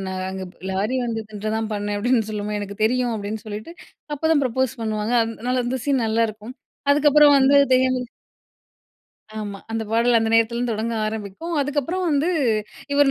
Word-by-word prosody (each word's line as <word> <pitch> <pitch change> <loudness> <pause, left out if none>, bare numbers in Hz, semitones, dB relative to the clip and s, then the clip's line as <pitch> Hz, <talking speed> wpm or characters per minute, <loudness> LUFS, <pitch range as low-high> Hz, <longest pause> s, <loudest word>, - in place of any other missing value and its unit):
நான் 185 0 -3
அங்க 190 0 -5
ப் - - -29
லாரி 205 +7 -1
வந்துதுன்னு 215 -2 -4
தான் 220 -1 -3
பண்ணேன்." 205 0 -2
அப்படீன்னு 225 -1 +1
சொல்லும்போது, 210 0 -3
"எனக்கு 200 +1 -5
தெரியும்." 245 +1 +1
அப்படீன்னு 210 +1 -5
சொல்லிட்டு, 215 +11 -7 0.4
அப்போதான் 315 0 +2
ப்ரப்போஸ் 260 0 -1
பண்ணுவாங்க. 215 +1 -1
அதனால 245 +3 -2
அந்த 260 +1 -1
சீன் 270 -5 +1
நல்லாருக்கும். 220 +1 -1 0.4
அதுக்கப்புறம் 295 0 +6
வந்து 275 +1 +4 0.2
தெரியாமலே 255 -1 +1 1.3
ஆமா, 205 -2 -5
அந்த 225 0 -1
பாடல் 235 +1 +3
அந்த 225 0 0
நேரத்துலிருந்து 235 +1 +2
தொடங்க 225 +2 -2
ஆரம்பிக்கும். 215 - -5
அதுக்கப்புறம் 290 +6 -1
வந்து 295 +3 +1 0.6
இவர் 285 -1 +4
230 Hz, 150 wpm, -22 LUFS, 215-260 Hz, 1.3 s, அதுக்கப்புறம்